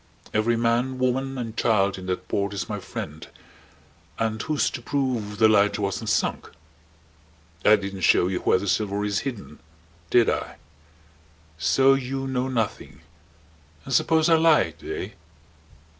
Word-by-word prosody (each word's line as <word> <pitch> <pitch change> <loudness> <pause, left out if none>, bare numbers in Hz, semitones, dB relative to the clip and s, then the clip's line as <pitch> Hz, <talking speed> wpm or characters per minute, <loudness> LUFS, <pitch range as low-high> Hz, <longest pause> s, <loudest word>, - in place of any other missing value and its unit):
Every 115 +2 +1
man, 120 +3 0
woman, 130 +1 -1
and 115 -3 -5
child 100 -5 +2
in 95 - -9
that 90 -1 -3
port 100 0 -2
is 100 - -3
my 105 -2 -4
friend. 80 -4 -7 0.9
And 110 -1 -1
who's 155 -2 0
to 120 - -6
prove 120 -6 -2
the 110 - +6
lighter 105 -1 +3
wasn't 105 +3 -2
sunk? - - -1 1.1
I 105 - +7
didn't 100 -2 -5
show 85 - +4
you 95 -1 -2
where - - +3
the 100 +2 -5
silver 105 +1 0
is 100 -2 0
hidden. 115 - -7 0.5
Did 120 -2 +4
I? - - -2 1.0
So 135 - +4
you 135 0 -2
know 130 -1 -1
nothing. 115 -9 -3 0.8
And 135 - -5
suppose 160 +5 +3
I 165 -1 +5
lied? 150 - +2
Eh?" - - -5
110 Hz, 145 wpm, -24 LUFS, 100-130 Hz, 1.1 s, I